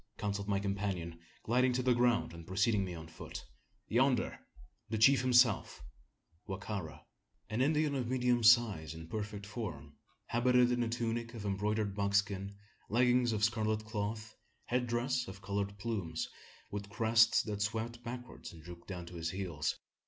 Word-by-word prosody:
counselled 100 -1 -2
my 100 -1 +1
companion, 95 -4 -3 0.2
gliding 125 +3 +3
to 125 +1 0
the 125 0 +4
ground, 120 -5 +2
and 85 -1 -10
preceding 100 +2 +2
me 90 -2 -5
on 80 -1 -8
foot, 80 - -9 0.4
"Yonder! 125 +2 +2 0.5
the 110 - -1
chief 125 +4 +6
himself 125 -4 +3 0.6
Wa 95 - -3
ka 100 +1 -4
ra!" 80 -6 -9 0.5
An 110 +3 0
Indian 150 +1 +2
of 130 -4 -1
medium 125 -1 +2
size 110 -9 +5
and 80 0 -10
perfect 105 -1 -4
form, 90 - -6 0.3
habited 125 +1 +3
in 120 0 +1
a 115 - 0
tunic 115 0 -2
of 105 -3 -6
embroidered 105 +1 0
buckskin, 100 0 0 0.3
leggings 125 +1 +3
of 105 -1 -1
scarlet 110 -1 +1
cloth, 110 0 -4 0.3
head 125 0 0
dress 125 +2 0
of 95 +1 -10
coloured 100 +1 -2
plumes, 100 -7 -3 0.4
with 100 0 -5
crest 115 +1 +4
that 105 -2 -3
swept 115 +3 -2
backward 125 +1 -7
and 80 -3 -13
drooped 85 0 -11
down 90 -3 -6
to 85 - -11
his 80 0 -2
heels. 85 -5 -2
110 Hz, 160 wpm, -33 LUFS, 100-120 Hz, 0.6 s, chief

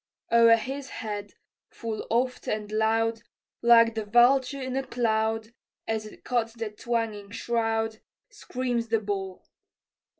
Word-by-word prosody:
O'er 230 0 +7
his 265 +4 -5
head, 205 -2 -6 0.3
full 225 -2 -5
oft 250 +2 0
and 215 -1 -2
loud, 225 +1 +1 0.4
Like 230 -1 +6
the 220 -1 -2
vulture 250 +5 +4
in 260 -1 -4
a 270 - +1
cloud, 225 -2 -1 0.3
As 220 -1 -2
it - - -15
cuts 235 -2 0
the 225 -2 -4
twanging 220 -2 -3
shroud, 225 0 -1 0.3
Screams 245 -2 -3
the 225 0 +2
ball. 195 -3 -4
225 Hz, 130 wpm, -27 LUFS, 220-240 Hz, 0.4 s, O'er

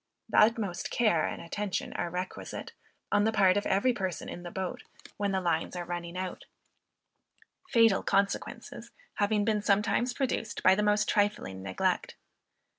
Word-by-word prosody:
The - - +4
utmost 210 -5 +2
care 215 -10 +2
and - - -5
attention 200 +3 -3
are 175 - -2
requisite, 180 +2 -5 0.4
on 205 - +4
the 220 - +2
part 190 -4 +4
of 205 - 0
every 205 +6 +2
person 190 -6 -3
in 175 - -7
the 175 - -7
boat, 190 +1 -4 0.4
when 205 -1 0
the 190 - +1
lines 170 -1 -1
are 175 -1 -4
running 175 0 -5
out; 185 0 -5 1.2
fatal 230 - +5
consequences 200 0 -1 0.3
having 205 0 +2
been 215 -1 +1
sometimes 210 +4 +1
produced 250 -5 -2
by 185 - +7
the 200 - +1
most 210 0 +2
trifling 205 - 0
neglect. 95 -1 -1
200 Hz, 155 wpm, -29 LUFS, 180-210 Hz, 1.2 s, by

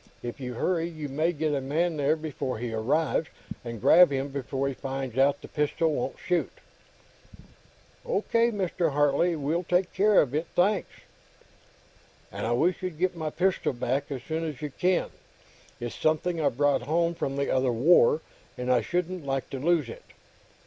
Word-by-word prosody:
If 120 +3 -6
you 125 -2 -5
hurry, 170 +5 0
you 155 -3 -6
may 155 +5 +1
get 155 -2 -1
a 140 - 0
man 160 +5 0
there 145 +2 +2
before 150 -5 -4
he 115 0 -4
arrives, 150 +8 0 0.4
and 115 -2 -6
grab 175 - +7
him 135 +1 -1
before 135 0 -3
he 140 - -2
finds 135 -2 -5
out 135 +2 +2
the - - -8
pistol 155 +2 0
won't - - -3
shoot." 180 -2 0 1.5
"O. - - -1
K., 230 +1 +2
Mr. 180 -7 -1
Hartley. 145 +4 +2
We'll 155 +3 -1
take 180 +1 0
care 205 +1 +4
of 135 -3 +1
it. 155 +3 -1
Thanks." 195 +3 +2 1.4
"And - - -4
I - - 0
wish 170 +9 +1
you'd 180 -4 -4
get 180 +1 0
my 160 -2 -3
pistol 180 +1 0
back, 130 +3 -2
as 130 -3 -4
soon 160 +3 -3
as 150 -5 -4
you 150 -1 -5
can. 180 +4 0 0.7
It's 120 -1 -5
something 160 +2 0
I 145 - +3
brought 145 +2 +1
home 170 +3 +1
from 135 -4 -3
the 140 - 0
other 130 -1 +2
War, 150 +4 +4 0.4
and 125 0 -1
I 125 - +4
shouldn't 180 -1 -2
like 135 -1 -3
to 135 - -4
lose 160 -1 +2
it." 115 - -9
150 Hz, 180 wpm, -27 LUFS, 135-175 Hz, 1.5 s, grab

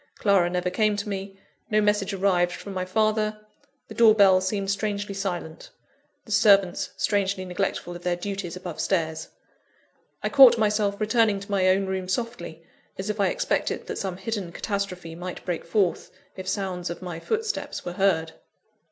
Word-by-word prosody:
Clara 195 -4 +3
never 180 0 -1
came 215 +2 +2
to 205 - -4
me, 195 -1 -5 0.3
no 215 - +3
message 210 -1 +1
arrived 185 -2 +1
from 200 - -8
my 185 -1 -2
father; 215 +2 0 0.5
the - - -9
door 225 -2 +6
bell 190 -3 +6
seemed 195 +1 -1
strangely 205 0 -2
silent, 175 -5 -5 0.6
the 220 - -11
servants 200 -3 +4
strangely 195 -2 0
neglectful 180 -1 -3
of 175 - -9
their 175 0 0
duties 195 -1 -5
above 180 -3 -7
stairs. 160 -4 -1 1.0
I - - 0
caught 265 -4 +8
myself 210 -2 +1
returning 215 -1 +2
to 200 +1 -9
my 190 -2 +2
own 190 +1 +3
room 190 -1 -3
softly, 230 -6 -4 0.3
as 195 +2 -2
if 210 - -8
I 200 - +3
expected - - -1
that - - -5
some 190 -2 -3
hidden 195 -3 -4
catastrophe 185 -3 -4
might 180 +2 -7
break 175 -3 -2
forth, 180 0 0 0.3
if 185 -1 -8
sound 185 -4 -2
of 170 +2 -7
my 175 -2 -5
footsteps 445 - -3
were 175 - -4
heard. 175 -4 +1
195 Hz, 170 wpm, -25 LUFS, 180-210 Hz, 1.0 s, caught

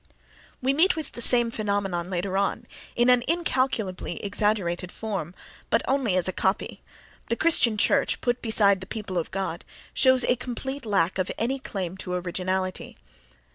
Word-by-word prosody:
We 265 +1 +2
meet 340 +7 +3
with 315 -3 -6
the 240 - -7
same 240 -1 +9
phenomenon 200 -5 -2
later 185 +1 -3
on, 200 +4 -1 0.3
in 240 +1 +2
an 250 -1 +4
incalculably 260 - -1
exaggerated 200 -4 -1
form, 190 -6 -5 0.3
but - - +1
only 260 -8 0
as 185 -1 +2
a 185 - -2
copy: 190 +2 -2 0.5
the 235 - 0
Christian 240 -8 +3
church, 275 +6 +1
put 245 0 -2
beside 200 -4 +2
the 190 - -9
"people 200 -5 -4
of 165 - -5
God," 190 -3 -4 0.3
shows 260 -1 +4
a 245 - +2
complete 260 +2 -6
lack 190 -3 0
of 185 - -1
any 260 +4 -2
claim 190 -6 -5
to 180 -1 -5
originality. 185 +1 -3
205 Hz, 160 wpm, -25 LUFS, 185-245 Hz, 0.5 s, same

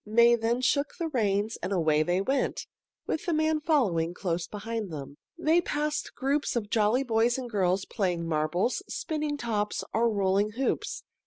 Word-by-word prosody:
May 235 +3 +5
then 235 +1 +1
shook 280 +3 +1
the 335 -1 -2
reins 215 -5 0
and - - -3
away 160 -5 +3
they 175 +4 +1
went, 265 +6 -1 0.4
with 320 - -3
the 345 - +2
man 315 0 +2
following 190 - +1
close 170 -3 -2
behind 215 0 -4
them. 140 -2 -7 0.2
They 335 +1 +3
passed 300 -2 -2
groups 280 +1 0
of 215 -3 -2
jolly 220 +4 +3
boys 235 0 +2
and 255 -2 -4
girls 190 -3 +1
playing 180 -6 -1
marbles, 165 - 0
spinning 300 -2 -2
tops, 215 -5 -2
or 230 +1 +3
rolling 200 0 +1
hoops. 265 +4 -2
225 Hz, 165 wpm, -28 LUFS, 190-270 Hz, 0.4 s, May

